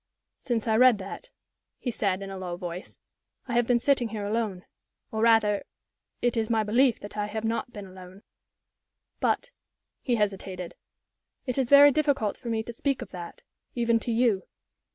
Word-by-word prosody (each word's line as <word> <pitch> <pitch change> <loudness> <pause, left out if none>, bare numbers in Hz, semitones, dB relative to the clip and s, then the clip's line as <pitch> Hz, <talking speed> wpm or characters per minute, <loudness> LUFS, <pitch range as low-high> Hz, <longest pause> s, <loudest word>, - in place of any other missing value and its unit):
"Since 235 -3 -2
I 220 0 +3
read 250 -2 +6
that," 195 - -8 0.5
he 245 - -3
said, 200 -3 -1
in 195 - -7
a 195 - -6
low 175 -2 -5
voice, 175 0 -7 0.5
"I 245 - -4
have 240 -1 +2
been 245 - +4
sitting 245 -1 +2
here 210 -2 -4
alone 210 -3 -2 0.5
or, 220 - -2
rather, 225 -3 +4 0.6
it 245 0 +2
is 225 -1 0
my 225 -2 +2
belief 240 +3 +3
that 205 - -9
I 210 0 -1
have 220 +1 -4
not 230 +2 -2
been 205 -4 -8
alone. 185 +1 -13 1.0
But" - - 0 0.5
he 245 - +1
hesitated 195 -4 -2 0.7
"it 255 0 -1
is 255 -3 0
very 285 0 +9
difficult 280 -8 +1
for 240 - -8
me 220 -1 0
to 235 - -7
speak 270 +1 -1
of 210 - -14
that 175 -2 -9 0.3
even 235 -1 +2
to 235 - -4
you. 225 -4 +2
225 Hz, 175 wpm, -27 LUFS, 200-240 Hz, 1.0 s, very